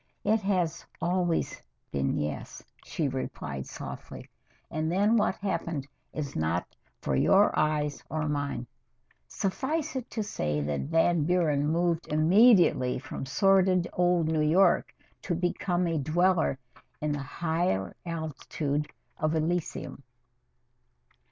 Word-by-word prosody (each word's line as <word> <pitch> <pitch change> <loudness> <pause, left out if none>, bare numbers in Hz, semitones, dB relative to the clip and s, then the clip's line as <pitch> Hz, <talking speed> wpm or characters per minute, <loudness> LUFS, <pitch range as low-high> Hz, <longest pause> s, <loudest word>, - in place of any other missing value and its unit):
"It 220 +1 +2
has 180 -5 0 0.2
always 175 0 0 0.3
been 70 -1 0
yes," 75 0 -4 0.2
she - - -2
replied 70 -1 -4
softly, - - -8 0.4
and 155 +1 -1
then 205 +5 +3
what 210 -3 +2
happened 170 -8 -3 0.2
is 145 -2 -5
not 80 +2 -1 0.3
for 65 - -1
your 195 - +5
eyes 150 -1 0
or 155 -1 -1
mine. 140 -4 -2 0.6
Suffice 275 - -2
it 255 -2 -4
to 220 - -2
say 75 - -2
that 70 -2 -2
Van 165 -1 +3
Buren 155 -5 +2
moved 170 +1 +1
immediately 170 - +5
from 135 0 -6
sordid 185 +3 +3
old 175 -2 +2
New 160 -1 +1
York 170 +4 +4 0.3
to 175 - -2
become 180 +1 0
a 165 -2 0
dweller 165 0 +2 0.4
in 150 0 -1
the 145 - -2
higher 160 - -1
altitudes 155 -3 -3 0.3
of 155 +1 +1
Elysium. 160 -3 -2
160 Hz, 120 wpm, -28 LUFS, 145-180 Hz, 0.6 s, your